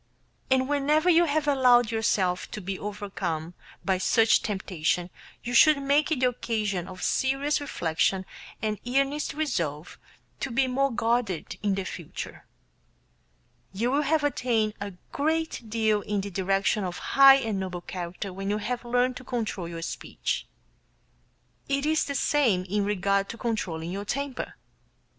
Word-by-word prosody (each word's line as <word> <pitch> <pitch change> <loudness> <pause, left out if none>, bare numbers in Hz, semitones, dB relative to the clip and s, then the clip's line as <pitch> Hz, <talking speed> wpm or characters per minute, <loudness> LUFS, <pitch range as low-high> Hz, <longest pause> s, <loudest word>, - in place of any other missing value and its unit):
And 260 0 +3
whenever 295 +4 +3
you 340 +1 +5
have 300 -1 0
allowed 250 -4 +5
yourself 190 -5 0
to - - -6
be 190 -1 -5
overcome 190 -5 -4 0.3
by 190 -2 +1
such 225 +3 +4
temptation 180 -3 -1 0.3
you 245 - -4
should 300 +4 +7
make 285 +3 +2
it 280 -5 0
the 250 - +5
occasion 210 -7 -2
of 185 -1 -8
serious 275 +3 +1
reflection 185 - 0 0.4
and 215 -1 -1
earnest 275 +4 0
resolve 170 - -2 0.4
to 275 - -2
be 260 +3 +2
more 270 +2 +1
guarded 230 -6 -1
in 200 -1 +1
future. 170 -4 -7 1.3
You 230 +6 0
will 285 +2 +2
have 300 +1 +1
attained 235 -7 +1
a 200 -1 -4 0.2
great 315 -5 -1
deal 220 -1 +1
in 205 0 -2
the 200 +1 -6
direction 195 +2 +1
of 180 -1 -4 0.2
high 275 0 +9
and 225 -7 -1
noble 180 -2 -4
character 180 +2 -6
when 195 +1 -4
you 205 - +1
have 240 +3 -3
learned 245 +1 +1
to - - -10
control 220 -8 -3
your 165 -1 -6
speech. - - -3 1.2
It 275 +1 0
is 315 0 +2
the 280 - -4
same 245 -12 +2
in 200 +2 -1
regard 200 0 +1
to 230 - -6
controlling 175 -8 -3
your 200 +2 -4
temper. 275 +4 -3
220 Hz, 150 wpm, -27 LUFS, 190-275 Hz, 1.3 s, high